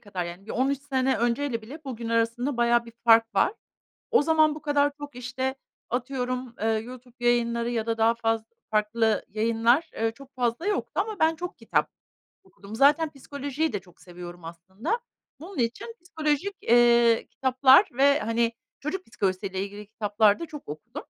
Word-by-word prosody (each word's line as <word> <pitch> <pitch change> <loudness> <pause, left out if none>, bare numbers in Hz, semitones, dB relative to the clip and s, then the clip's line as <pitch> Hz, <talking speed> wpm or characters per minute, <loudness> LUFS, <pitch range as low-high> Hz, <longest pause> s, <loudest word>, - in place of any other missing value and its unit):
kadar 190 -4 -5
yani, 175 +4 -9
bir - - -8
13 270 +2 +1
sene 265 -1 +1
önceyle 235 0 0
bile 290 +8 -11
bugün 235 -4 -5
arasında 230 +4 0
bayağı 235 0 +3
bir 230 - -12
fark 225 -1 +5
var. - - +3 0.6
O 465 - +5
zaman 310 -1 +3
bu 310 - -9
kadar 290 -1 +2
çok, 290 -3 -9
işte, 260 +2 -3 0.3
atıyorum, 250 0 -3
eee, 220 - +1
YouTube 240 +3 -4
yayınları 235 -1 +2
ya 230 -2 -1
da 230 0 -1
daha 225 +1 +4
faz 225 -1 0 0.3
farklı 215 +1 +1
yayınlar, 230 +8 +2
ııı, 225 0 +2
çok 275 +3 -16
fazla 245 +5 -1
yoktu 415 -2 -1
ama 430 -2 -2
ben 320 +1 +3
çok 355 +2 -6
kitap - - 0 0.6
okudum. 200 +2 -12
Zaten 295 +5 +4
psikolojiyi 285 +2 -3
de 205 - -2
çok 180 -1 -22
seviyorum 175 -1 -10
aslında. 190 - -4 0.4
Bunun 355 -1 -9
için 245 - -2
psikolojik, 320 +2 -1
eee, 235 -1 +5
kitaplar 260 0 +5
ve, 280 +3 +4
hani, 230 +1 0 0.3
çocuk 365 +6 -4
psikolojisiyle 190 -2 -2
ilgili 205 +1 -9
kitaplar 210 -1 +2
da 335 - -4
çok 300 -2 -10
okudum. 150 +1 -7
240 Hz, 165 wpm, -26 LUFS, 225-285 Hz, 0.6 s, fark